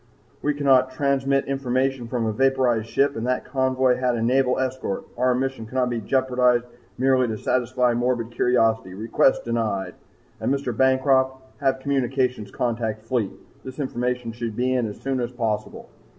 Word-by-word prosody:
We 150 0 0
cannot 135 -3 +4
transmit 140 0 +1
information 135 -2 -1
from 120 -1 -1
a 110 - 0
vaporized 130 -3 +2
ship, 140 +1 +2
and 115 +2 -3
that 125 0 -1
convoy 130 -1 +1
had 125 -1 +1
a 115 - -2
naval 125 +1 +2
escort. 130 - -2
Our 125 0 +2
mission 130 -3 -3
cannot 125 +1 0
be 115 -1 -2
jeopardized 125 0 +2 0.3
merely 130 0 +3
to 110 -1 -3
satisfy 125 +1 +1
morbid 120 -1 -1
curiosity. 115 -5 +1
Request 115 +5 +2
denied. 110 -5 -1 0.5
And, - - -1
Mr. 135 -4 -1
Bancroft, 130 +1 +3 0.2
have 135 -2 +1
Communications 130 -4 0
contact 115 -3 -2
Fleet. 115 -4 0 0.3
This 130 0 -9
information 125 -3 -2
should 115 -1 -5
be 125 +2 +1
in 125 -3 +1
as 105 - -8
soon 135 -1 -2
as 120 0 -2
possible.' 115 -4 -3
125 Hz, 160 wpm, -23 LUFS, 120-130 Hz, 0.5 s, cannot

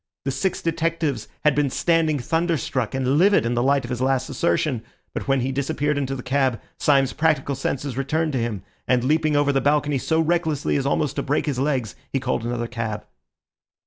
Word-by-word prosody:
The 135 - 0
six 190 +7 -1
detectives 165 -7 -1 0.2
had 150 -2 +4
been 145 0 +1
standing 160 +1 +2
thunderstruck 145 -5 -1
and 135 +2 +1
livid 195 - +4
in 120 - 0
the 120 - +1
light 140 +1 +2
of 120 - -7
his 125 0 -3
last 130 0 +1
assertion; 150 -7 0 0.3
but - - -4
when 135 -1 +2
he 130 +2 -1
disappeared 140 +2 -1
into 135 -1 -2
the 125 - -7
cab, 130 -3 +1 0.2
Syme's 135 -3 +3
practical 150 -3 +1
senses 135 -1 -3
returned 155 +3 0
to 130 - 0
him, 110 -5 -3 0.2
and 125 -1 +2
leaping 155 +2 +2
over 145 0 +3
the 135 - +2
balcony 145 0 +2
so 160 +5 +1
recklessly 160 -3 +1
as 140 -1 0
almost 145 0 0
to - - +1
break 145 - 0
his 140 -5 -1
legs, 130 -9 -1 0.2
he 135 - 0
called 125 -3 -1
another 120 0 -2
cab. 115 -3 -4
140 Hz, 200 wpm, -23 LUFS, 130-155 Hz, 0.3 s, had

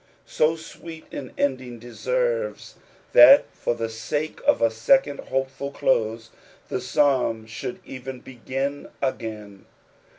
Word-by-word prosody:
Bo 155 +1 +4
sweet 160 0 -11
an 130 -3 -6
ending 130 -3 -1
deserves - - -2 0.4
that 285 -1 +9
for 120 - -2
the 115 -1 -2
sake 115 +8 -4
of - - +5
a 115 -1 +3
second 145 - +3
hopeful 135 +1 -3
close 115 -4 0 0.4
the 125 - -2
Psalm 125 -4 +1
should 120 +3 -6
even 130 0 -7
begin 135 +3 -4
again. 110 -6 -4
130 Hz, 120 wpm, -24 LUFS, 115-145 Hz, 0.4 s, that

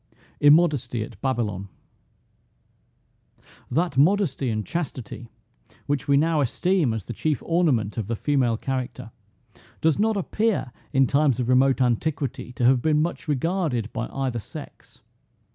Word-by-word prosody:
IMMODESTY 145 -7 +4
AT - - -12
BABYLON. 110 -8 -2 2.0
That 170 -4 0
modesty 155 -5 +2
and 110 -2 -2
chastity, 125 - -5 0.6
which 140 -2 -2
we 140 -1 +4
now 160 +1 +2
esteem 165 +2 +1
as 110 -4 -4
the 120 - -6
chief 150 +4 -1
ornament 140 - +1
of 105 - -3
the 115 - -1
female 125 -3 +1
character, 130 0 -4 0.7
does 160 +1 +2
not 220 0 +2
appear 210 - -1 0.2
in 135 0 +4
times 140 -2 +2
of 125 -1 -1
remote 130 +1 +4
antiquity 130 +2 -1
to 120 - -1
have 125 0 +4
been 155 +1 +2
much 165 +1 -2
regarded 150 - -1
by 115 - -3
either 130 -3 -3
sex. - - -11
135 Hz, 135 wpm, -24 LUFS, 120-160 Hz, 2.0 s, IMMODESTY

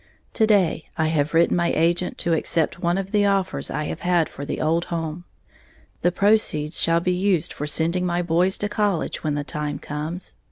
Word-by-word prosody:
To 220 - +3
day 190 -7 +2
I 160 -1 +1
have 155 0 0
written 170 +1 +4
my 170 -1 +1
agent 175 +2 +1
to 170 - +2
accept 165 +1 0
one 175 +1 +1
of 195 0 -4
the 205 -1 +3
offers 195 -2 0
I 150 - -2
have 155 - -4
had 175 -2 +1
for 140 - -7
the - - -4
old 165 +2 +1
home, 165 0 -4 0.8
the 175 - +3
proceeds 180 -6 +2
shall 165 0 +3
be 180 +1 +1
used 180 -3 0
for 150 - -5
sending 165 +4 0
my 175 0 0
boys 175 +3 +2
to 205 - -1
college 205 -4 -1
when 150 -2 0
the 145 - -2
time 150 0 -4
comes. 155 +5 -6
170 Hz, 200 wpm, -23 LUFS, 155-185 Hz, 0.8 s, written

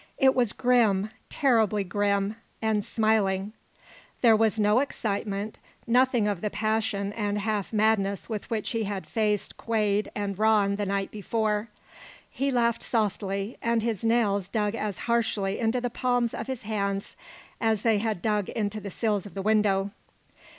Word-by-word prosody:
It 265 -1 +5
was 240 -4 +2
grim, 220 -6 +2 0.2
terribly 220 -6 +2
grim 200 +2 0 0.2
and 220 -2 +1
smiling. 210 -3 +1 0.7
There 230 -3 +6
was 220 0 +2
no 210 +2 +4
excitement, 210 -5 -3 0.3
nothing 245 -2 +3
of 200 -4 -1
the 210 - -1
passion 210 -1 -1
and 205 -2 -1
half 205 -1 -2
madness 210 -2 +1
with 215 -1 -5
which 220 -3 -2
he 225 -2 -1
had 195 -1 -4
faced 210 -2 -1
Quade 210 -2 0
and 200 -2 -3
Rann 210 -2 +3
the 205 -1 -2
night 195 0 -1
before. 215 +1 -1 0.6
He 275 +1 -1
laughed 235 -3 +1
softly, 200 -1 -1
and 230 -1 +1
his 225 -4 -2
nails 215 -5 +2
dug 210 0 -1
as 215 -4 -3
harshly 220 -4 0
into 230 +2 +1
the 245 -1 -3
palms 245 -1 0
of - - -5
his 260 -3 -4
hands 200 -2 -2 0.4
as 220 -3 +1
they 225 -3 +3
had 215 -5 -2
dug 210 -3 0
into 215 -1 -2
the 200 - -6
sills 205 0 -1
of 200 - -14
the 195 - -3
window. 205 -2 +2
215 Hz, 155 wpm, -27 LUFS, 200-225 Hz, 0.7 s, There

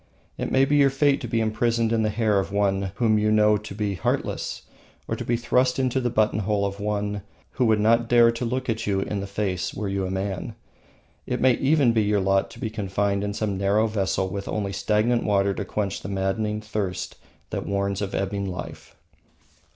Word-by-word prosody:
It - - -4
may 135 +1 +4
be 145 +2 +2
your 140 -1 +5
fate 140 +1 +2
to 120 - -4
be 115 0 0
imprisoned 115 +1 +1
in 115 - +2
the 110 - +1
hair 105 -2 +1
of 95 - -3
one 100 -1 0
whom 110 -2 +2
you 105 0 +2
know 105 0 +5
to 105 -1 -9
be 105 -1 -1
heartless 90 - -2 0.4
or - - -1
to - - -5
be 120 - 0
thrust 125 +2 +1
into 130 0 +1
the 120 - 0
buttonhole 105 -2 +1
of 100 0 -4
one 105 0 -2 0.3
who 125 - 0
would 110 -2 +3
not 115 +2 +3
dare 120 -1 +6
to 115 +1 -5
look 125 +2 -2 0.2
you 95 -1 +1
in 100 +1 -3
the 100 - -4
face 100 -3 -2
were 105 0 -3
you 95 -1 -1
a - - -4
man. 95 0 -3 0.7
It - - -1
may 130 -1 +5
even 135 -1 +3
be 110 - +3
your 105 0 +2
lot 95 0 +1
to - - -13
be 110 -4 -3
confined 100 -1 -1
in 100 0 -3
some 100 -4 -2
narrow 100 +3 +2
vessel 95 -3 0
with 100 +1 -5
only 100 -2 -2
stagnant 105 +4 +1
water 100 -1 +2
to 100 - -4
quench 100 -1 -3
the - - -6
maddening 105 +2 -1
thirst 105 -4 -4 0.3
that - - -3
warns 100 0 -1
of 100 -1 -3
ebbing 100 0 -2
life. 90 -1 -8
105 Hz, 210 wpm, -24 LUFS, 100-115 Hz, 0.7 s, dare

